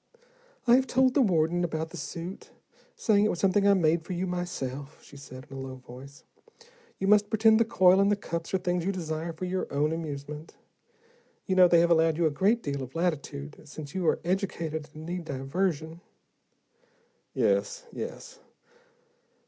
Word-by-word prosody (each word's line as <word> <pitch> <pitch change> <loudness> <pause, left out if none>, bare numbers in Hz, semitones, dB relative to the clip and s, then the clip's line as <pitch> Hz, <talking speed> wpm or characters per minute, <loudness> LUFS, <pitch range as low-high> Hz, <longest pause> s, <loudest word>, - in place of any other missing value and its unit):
"I 240 - +5
have 265 0 0
told 260 0 +3
the 280 - +4
warden 175 -4 +2
about 160 -1 -3
the 175 - -8
suit, 170 +4 -7 0.5
saying 205 -2 +3
it - - +2
was 175 - -2
something 200 +2 +3
I 200 - +6
made 165 -2 +2
for 180 - -5
you 180 +1 -2
myself," 145 -6 -5
she - - -15
said, 130 -1 -11
in - - -8
a - - -6
low 130 -1 -6
voice. 130 +2 -13 0.7
"You 195 - -3
must 205 0 +4
pretend 220 0 +4
the 230 - +4
coil 190 -4 +5
and 200 +1 +4
the - - +4
cups 170 -4 -5
are 190 - +2
things 180 -1 -1
you 195 - 0
desire 165 -2 -4
for 165 +3 -6
your 185 +1 -3
own 145 +2 +1
amusement. 150 -1 -6 0.9
You 190 - 0
know, 185 -1 +8
they 170 -1 +5
have 170 0 +2
allowed 160 -1 +3
you 170 - +2
a 155 - +3
great 205 +10 +2
deal 140 -1 -3
of 130 +2 -8
latitude, 150 -4 -3
since 150 -1 -9
you 185 -3 -1
are - - +2
educated 170 -5 -2
and 155 +1 -8
need 175 +1 -4
diversion." 160 +3 -2 1.3
"Yes, - - +1
yes. - - -7
170 Hz, 180 wpm, -28 LUFS, 150-190 Hz, 1.3 s, know